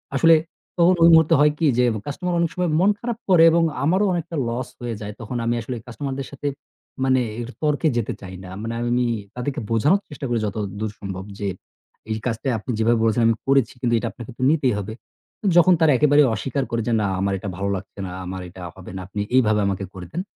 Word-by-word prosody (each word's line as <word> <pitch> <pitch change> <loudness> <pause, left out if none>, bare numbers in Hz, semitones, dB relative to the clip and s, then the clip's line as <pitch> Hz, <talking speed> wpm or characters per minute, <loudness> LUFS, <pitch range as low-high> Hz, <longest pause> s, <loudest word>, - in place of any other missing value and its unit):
আসলে 165 +4 +6 0.4
তখন 175 +1 +5
ওই 165 - +8
মুহূর্তে 160 -1 +6
হয় 150 +1 +5
কি 165 - 0
যে 125 - +4 0.2
কাস্টমার 180 +5 -3
অনেক 170 -1 +2
সময় 180 -1 0
মন 190 +3 +4
খারাপ 235 -2 -3
করে 175 -3 +7
এবং 170 +1 +3 0.2
আমারও 185 +8 +3
অনেকটা 170 -1 -3
লস 120 +2 -3
হয়ে 120 -2 -3
যায় 105 0 -5
তখন 120 +2 -4
আমি 120 +1 +1
আসলে 125 +2 -5
কাস্টমারদের 135 +3 -5
সাথে 140 +1 -5 0.6
মানে 130 -1 +3 0.2
একটু 120 +1 -5
তর্কে 150 +1 +2
যেতে 115 - -1
চাই 95 -2 -8
না। 90 - -9
মানে 115 +1 -4
আমি 120 0 -1
নি 125 - +2 0.3
তাদেরকে 125 +2 -3
বোঝানোর 150 - +3
চেষ্টা 145 -2 -7
করি 120 -1 +1
যতদূর 105 +1 -3
সম্ভব 95 -2 -5 0.2
যে, 100 - -2 0.6
এই - - +1
কাজটা 115 +1 -2
আপনি 125 - -5
যেভাবে 115 +1 +3
বলেছেন 115 +1 +2
আমি 115 - +3
করেছি 135 -4 +3
কিন্তু 120 -2 +1
এটা 115 - -3
আপনাকে 120 +1 -10
তো - - -9
নিতেই 145 -6 +2
হবে। 105 +2 -4 0.5
উ - - -5
যখন 180 +2 +7
তারা 160 -2 +5
একেবারেই 145 0 +5
অস্বীকার 135 +5 -2
করে 115 -1 0
যে, 120 - +1
না - - 0
আমার 100 +1 0
এটা 100 - -5
ভালো 100 +1 -1
লাগছে 95 +1 -9
না, - - -7
আমার 95 +1 -5
এটা 90 +1 -12
হবে 95 -1 -10
না, - - -5
আপনি 105 +1 -4
এইভাবে 110 -4 +4
আমাকে 95 0 -2
করে 90 -2 -8
দেন। 180 - -1
125 Hz, 220 wpm, -22 LUFS, 105-150 Hz, 0.6 s, ওই